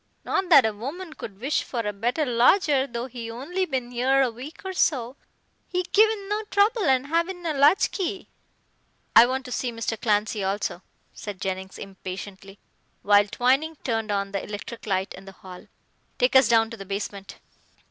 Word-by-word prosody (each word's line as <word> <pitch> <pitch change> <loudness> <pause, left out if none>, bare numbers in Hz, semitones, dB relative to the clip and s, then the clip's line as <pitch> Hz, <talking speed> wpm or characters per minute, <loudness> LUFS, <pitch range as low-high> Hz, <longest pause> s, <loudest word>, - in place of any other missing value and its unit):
Not 375 -1 -1
that 280 -8 +8
a 220 - 0
woman 305 - -7
could 200 -9 -9
wish 270 +6 0
for 240 - -3
a 210 -2 -3
better 240 +9 -1
lodger, 270 +3 +3
though 235 -1 -4
he 240 -3 -7
only 335 +11 -3
bin 255 -3 -3
'ere 265 +3 +3
a 250 - 0
week 265 +9 -10
or 380 - -3
so, 260 -8 0 0.5
he 360 0 -1
givin' 425 +1 +2
no 420 +1 -1
trouble 415 +1 +2
and 265 -2 +3
havin' 340 +4 -1
a 320 - 0
latch 290 +6 +4
key." 375 0 -3 0.9
"I 240 - +9
want 260 +1 -3
to 250 - -8
see 245 0 -2
Mr. 230 -1 -4
Clancy 210 -1 +1
also," 190 -2 -2 0.3
said 205 -3 -8
Jennings 190 -1 -4
impatiently, 195 0 -9 0.5
while 205 0 +5
Twining 265 +9 +1
turned 225 -3 -1
on 200 -1 -1
the 195 -1 -3
electric 215 +2 -8
light 190 -1 -1
in 195 - -12
the 195 - -11
hall. 185 -1 -12 0.5
"Take 250 +2 +2
us 265 -4 +7
down 225 -1 +3
to 230 - -7
the 195 - -9
basement." 200 0 -5
245 Hz, 180 wpm, -25 LUFS, 205-305 Hz, 0.9 s, I